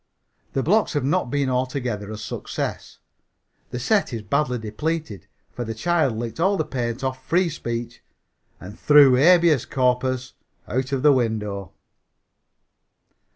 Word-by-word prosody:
The 135 - 0
blocks 205 - +2
have 145 -3 0
not 145 -1 0
been 140 +1 0
altogether 125 -5 -2
a 110 - -6
success. 105 -1 -5 0.7
The - - -5
set 195 - +1
is 115 -3 -5
badly 125 +3 0
depleted, 115 - -4 0.2
for 120 - -5
the 115 -1 -5
child 150 -2 +1
licked 115 +3 -5
all 195 +4 +2
the 155 - -1
paint 120 -1 -3
off 130 0 -3
"Free 175 +1 +1
Speech" 120 -6 -5 0.6
and 95 +3 -11
threw 145 -3 +7
"Habeas 165 0 +5
Corpus" 130 0 0 0.3
out 130 +3 -2
of 135 -1 -1
the 150 -1 +7
window. 105 -6 -2
130 Hz, 140 wpm, -23 LUFS, 115-150 Hz, 0.7 s, threw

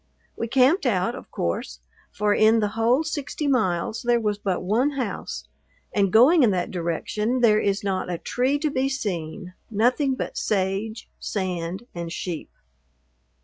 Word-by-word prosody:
We 230 - -3
camped 265 - +3
out, 195 0 +1
of - - -10
course, 65 -7 -3 0.3
for 210 0 +1
in 220 +2 +5
the 210 -1 +1
whole 230 +7 +2
sixty 300 -1 -4
miles 220 -7 +1
there 240 0 +2
was 210 -2 -1
but 190 -4 -1
one 240 +10 +1
house, 240 -7 -4 0.5
and 200 -2 +2
going 265 - +6
in 240 - +5
that 180 -3 -1
direction 210 +8 -1
there 215 -3 +5
is 200 -1 0
not 190 -2 -1
a 175 - -2
tree 255 - 0
to 300 0 -1
be 270 0 0
seen, 180 - -4 0.2
nothing 250 +5 +2
but - - -4
sage, 200 +2 -1
sand, 185 +1 -3
and 170 -1 -5
sheep. 175 -2 -5
215 Hz, 155 wpm, -24 LUFS, 185-250 Hz, 0.5 s, going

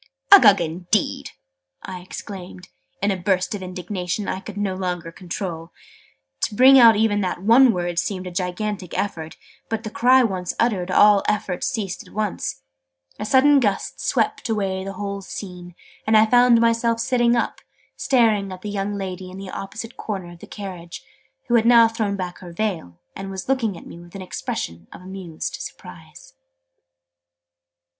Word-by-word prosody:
"Uggug, 205 - +9
indeed!" 175 +5 -1 0.5
I 185 -1 -7
exclaimed, 185 0 -9 0.3
in 200 - +3
a - - 0
burst 185 +3 0
of 205 - -5
indignation 180 +1 -4
I - - -2
could 205 +1 -10
no 200 -2 -1
longer 180 -3 -4
control. 175 -2 -6 0.7
To 210 - -6
bring 265 +3 +8
out 230 -2 +8
even 210 -1 +2
that 180 -1 -3
one 240 +4 +6
word 175 -3 -2
seemed 185 0 -3
a 180 - -6
gigantic 185 +1 -3
effort: 160 -5 -4 0.3
but, 225 -1 -3
the 215 - -6
cry 255 +2 +5
once 185 -5 -2
uttered, 200 -6 +1
all 205 +1 +6
effort 190 -3 -1
ceased 215 -9 -3
at - - -17
once: 205 - -3 0.6
a 210 - -3
sudden 275 +5 +5
gust 205 -6 -1
swept 250 - -1
away 195 -3 -1
the 195 0 -6
whole 200 0 -5
scene, 180 -3 -9 0.3
and 220 0 +5
I 215 - +6
found 245 +1 +5
myself 230 0 +2
sitting 240 0 +2
up, 235 - -2 0.3
staring 220 -6 +2
at 185 0 -9
the 210 - -4
young 205 0 -2
lady 185 -1 -5
in 185 - -10
the 195 -1 -8
opposite 220 +4 -7
corner 190 -5 -5
of 175 - -14
the - - -12
carriage, 180 -4 -8 0.4
who 240 - -1
had 230 -1 +4
now 235 -1 +7
thrown 220 -3 -2
back 180 -2 -5
her 175 -2 -10
veil, 170 - -3 0.2
and 195 0 -6
was 190 -1 -6
looking 235 -8 0
at - - -13
me 170 - -11
with 175 +2 -15
an 195 - -6
expression 85 - -5
of - - -11
amused 185 -4 -6
surprise. - - -11
195 Hz, 170 wpm, -22 LUFS, 180-220 Hz, 0.7 s, Uggug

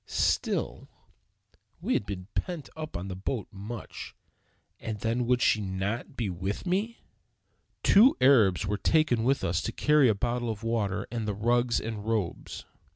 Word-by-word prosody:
Still, - - -1 0.9
we - - -1
had 100 - 0
been 90 -2 -5
pent 175 -5 -3
up 155 -5 -7
in 90 +2 -4
the 95 - -5
boat 100 +4 -3
much; 105 +4 -8 0.6
and 110 -1 -4
then 115 +3 -1
would 125 -1 +2
not 100 +4 -2
she - - -19
be 115 -5 -2
with 95 - -4
me? 205 +6 -1 0.8
Two 225 +7 +6
Arabs 115 -9 +5
were 100 +1 -2
taken 150 -8 +2
with 135 +3 +1
us 85 0 0
to - - -3
carry 150 -4 +4
a 110 - +2
bottle 120 +3 -1
of 110 0 -5
water 105 -4 -1
and 115 -3 -3
the 105 - -1
rugs 120 +3 +2
and 110 -2 -5
robes. 105 -6 -3
115 Hz, 160 wpm, -28 LUFS, 100-125 Hz, 0.9 s, Two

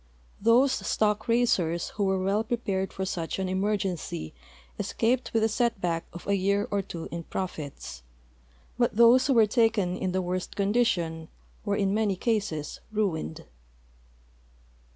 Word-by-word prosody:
Those 240 +5 +5
stock 215 -1 0
raisers 185 -8 +1
who 205 - -2
'were 190 0 +2
well 200 +3 +1
prej^ared 205 -5 -2
for 190 - -3
such 170 -3 -3
an 190 -1 -1
emergency 190 - -2 0.5
esca])ed 245 +3 0
with 225 -1 +2
a - - +4
set 235 +1 +1
hack 170 -3 -1
of 175 - -10
a 200 - +2
year 200 +2 +1
or 200 -1 +1
two 170 -3 -7
in 170 - -4
profits, 145 - -6 0.8
but 240 -3 +2
those 235 +3 +6
who 270 - +3
were 225 -2 +7
taken 215 -5 +2
in 185 0 -2
the 185 0 0
worst 180 0 -3
condition 195 -7 0 0.4
were 205 -2 0
in 195 -1 +1
many 210 -2 +1
cases 195 -8 -2
ruined. 185 - -2
200 Hz, 150 wpm, -27 LUFS, 180-225 Hz, 0.8 s, were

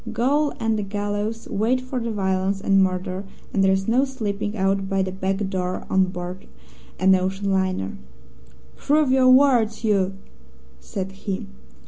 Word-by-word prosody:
Gaol 280 +6 +1
and 225 -1 0
the - - 0
gallows 205 +2 -3
wait 225 +5 +1
for 255 0 -4
violence 195 -4 -1
and 195 0 +3
murder, 185 0 -1 0.3
and 195 - +2
there's 190 0 +2
no 245 +4 +3
slipping 215 -5 -3
out 195 0 0
by 195 -1 +1
the 185 - -3
back 190 +1 -2
door 185 -1 -3
on 190 0 +4
board 180 0 -7 0.5
an 190 +1 +5
ocean 190 +2 0
liner. 185 - -1 0.8
"'Prove 295 -2 +2
your 260 -1 +5
words, 255 -5 +4
you 195 -3 +1 0.3
!' 65 - -27 0.3
said 190 - -5
he. 195 0 -5
195 Hz, 150 wpm, -23 LUFS, 190-225 Hz, 0.8 s, an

